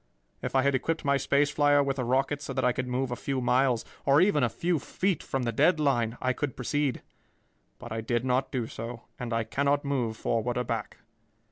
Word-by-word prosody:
If -, -, -4 dB
I 130 Hz, -, +4 dB
had 140 Hz, 0 st, +2 dB
equipped 155 Hz, +5 st, -1 dB
my 140 Hz, 0 st, +3 dB
space 140 Hz, +2 st, +2 dB
flier 145 Hz, -1 st, +4 dB
with 135 Hz, -1 st, -2 dB
a -, -, 0 dB
rocket 135 Hz, +4 st, 0 dB
so 135 Hz, -, -5 dB
that 130 Hz, -1 st, 0 dB
I 125 Hz, -, +4 dB
could 125 Hz, +1 st, -3 dB
move 125 Hz, +1 st, -1 dB
a -, -, -1 dB
few 135 Hz, +2 st, -2 dB
miles, 125 Hz, -1 st, +2 dB, 0.2 s
or 140 Hz, +1 st, +5 dB
even 180 Hz, -5 st, +4 dB
a 125 Hz, -, +3 dB
few 165 Hz, +9 st, 0 dB
feet, 185 Hz, +3 st, -1 dB
from 135 Hz, -1 st, -3 dB
the 120 Hz, -, 0 dB
dead 155 Hz, +8 st, +3 dB
line, 120 Hz, -5 st, +1 dB
I 130 Hz, 0 st, +1 dB
could 140 Hz, -1 st, -3 dB
proceed, 145 Hz, +1 st, -1 dB, 0.7 s
but 120 Hz, -2 st, -10 dB
I 110 Hz, 0 st, -2 dB
did 120 Hz, +2 st, -1 dB
not 130 Hz, +1 st, +1 dB
do 125 Hz, -5 st, -1 dB
so, 115 Hz, +1 st, -7 dB, 0.2 s
and 120 Hz, -1 st, -4 dB
I 115 Hz, 0 st, +1 dB
cannot 140 Hz, +5 st, 0 dB
move 125 Hz, -6 st, -1 dB
forward 115 Hz, +2 st, -1 dB
or 125 Hz, -, +1 dB
back. -, -, -4 dB
130 Hz, 225 wpm, -28 LUFS, 120-145 Hz, 0.7 s, or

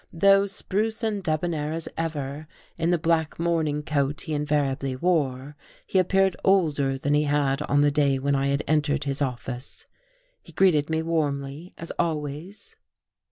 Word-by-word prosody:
Though 195 Hz, +3 st, +4 dB
spruce 210 Hz, +3 st, -2 dB
and 210 Hz, -3 st, -1 dB
debonnair 155 Hz, -1 st, -1 dB
as 165 Hz, 0 st, -3 dB
ever, 150 Hz, -2 st, -4 dB, 0.3 s
in 165 Hz, -, 0 dB
the 175 Hz, -, +3 dB
black 160 Hz, -1 st, 0 dB
morning 160 Hz, -3 st, 0 dB
coat 145 Hz, 0 st, -1 dB
he 160 Hz, -, -4 dB
invariably 145 Hz, -3 st, 0 dB
wore, 145 Hz, -3 st, 0 dB, 0.3 s
he 190 Hz, -, +1 dB
appeared 190 Hz, 0 st, +2 dB
older 150 Hz, -8 st, +2 dB
than 145 Hz, +2 st, -1 dB
he 150 Hz, +1 st, +3 dB
had 145 Hz, -1 st, +1 dB
on 145 Hz, -1 st, +2 dB
the 145 Hz, 0 st, +4 dB
day 140 Hz, -2 st, +2 dB
when 140 Hz, +2 st, 0 dB
I 135 Hz, 0 st, +1 dB
had 140 Hz, +1 st, 0 dB
entered 150 Hz, -1 st, +1 dB
his 140 Hz, 0 st, -3 dB
office. 125 Hz, -1 st, -4 dB, 0.6 s
He -, -, -16 dB
greeted 160 Hz, -6 st, +3 dB
me 160 Hz, 0 st, 0 dB
warmly, 150 Hz, 0 st, -2 dB
as 165 Hz, -, -6 dB
always. 165 Hz, -, -4 dB
150 Hz, 160 wpm, -25 LUFS, 140-170 Hz, 0.6 s, Though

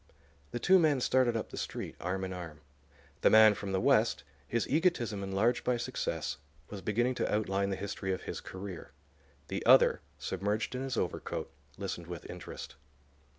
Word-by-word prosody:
The 120 Hz, -, -4 dB
two 190 Hz, +9 st, +5 dB
men 155 Hz, -5 st, +3 dB
started 125 Hz, -2 st, +3 dB
up 110 Hz, -, -5 dB
the -, -, -7 dB
street, -, -, -4 dB
arm 95 Hz, +1 st, -2 dB
in 95 Hz, 0 st, -3 dB
arm. 80 Hz, -4 st, -8 dB, 0.6 s
The -, -, +6 dB
man 110 Hz, -1 st, +8 dB
from 100 Hz, -1 st, -5 dB
the 95 Hz, -, +1 dB
West, 70 Hz, -, +3 dB, 0.2 s
his 115 Hz, -1 st, 0 dB
egotism 140 Hz, -, +1 dB
enlarged 100 Hz, +5 st, +1 dB
by 125 Hz, -1 st, +1 dB
success, 120 Hz, -, -3 dB, 0.3 s
was 100 Hz, -2 st, -6 dB
beginning 120 Hz, +6 st, +1 dB
to -, -, 0 dB
outline 100 Hz, -2 st, +1 dB
the 95 Hz, -, -1 dB
history 95 Hz, 0 st, -3 dB
of 95 Hz, -, -3 dB
his -, -, -5 dB
career. 95 Hz, -2 st, -8 dB, 0.6 s
The -, -, -3 dB
other, -, -, +6 dB, 0.2 s
submerged 105 Hz, +4 st, -2 dB
in 125 Hz, -, -3 dB
his 135 Hz, -3 st, -3 dB
overcoat, 90 Hz, -, -3 dB, 0.3 s
listened 90 Hz, -4 st, -5 dB
with 85 Hz, -2 st, -7 dB
interest. -, -, -8 dB
105 Hz, 170 wpm, -31 LUFS, 95-120 Hz, 0.6 s, man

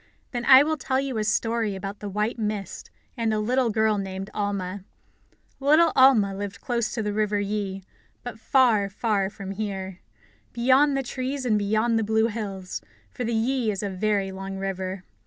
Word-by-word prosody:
Then 240 Hz, -1 st, -3 dB
I 265 Hz, +1 st, +9 dB
will 315 Hz, +1 st, -1 dB
tell 260 Hz, -1 st, 0 dB
you 270 Hz, -4 st, -2 dB
a -, -, 0 dB
story 225 Hz, -1 st, 0 dB
about 195 Hz, +2 st, -6 dB
the 205 Hz, -, -5 dB
white 210 Hz, +4 st, -2 dB
mist 210 Hz, -2 st, -4 dB, 0.3 s
and 230 Hz, -3 st, 0 dB
a 215 Hz, -, 0 dB
little 245 Hz, +3 st, +1 dB
girl 220 Hz, -1 st, +2 dB
named 195 Hz, 0 st, -5 dB
Alma. 200 Hz, -2 st, -3 dB, 0.8 s
Little 310 Hz, +4 st, +5 dB
Alma 255 Hz, -7 st, +5 dB
lived 205 Hz, +2 st, -5 dB
close 235 Hz, -4 st, -1 dB
to 225 Hz, -, -2 dB
the 210 Hz, 0 st, -2 dB
River 210 Hz, -1 st, 0 dB
Yi, 200 Hz, -1 st, -3 dB, 0.4 s
but 245 Hz, -2 st, -7 dB
far, 225 Hz, -6 st, +3 dB
far 200 Hz, -1 st, 0 dB
from 195 Hz, -1 st, -8 dB
here, 195 Hz, -2 st, -5 dB, 0.5 s
beyond 265 Hz, +4 st, +3 dB
the 270 Hz, -, -1 dB
trees 260 Hz, +1 st, -4 dB
and 215 Hz, -4 st, +2 dB
beyond 220 Hz, +3 st, +1 dB
the -, -, 0 dB
blue 220 Hz, +1 st, +2 dB
hills, 195 Hz, -4 st, -5 dB, 0.3 s
for 250 Hz, -, -5 dB
the 235 Hz, -1 st, -1 dB
Yi 240 Hz, +1 st, +1 dB
is 200 Hz, -1 st, -2 dB
a 200 Hz, -, -2 dB
very 195 Hz, 0 st, 0 dB
long 195 Hz, 0 st, -6 dB
river. 190 Hz, -1 st, -4 dB
215 Hz, 180 wpm, -25 LUFS, 195-240 Hz, 0.8 s, I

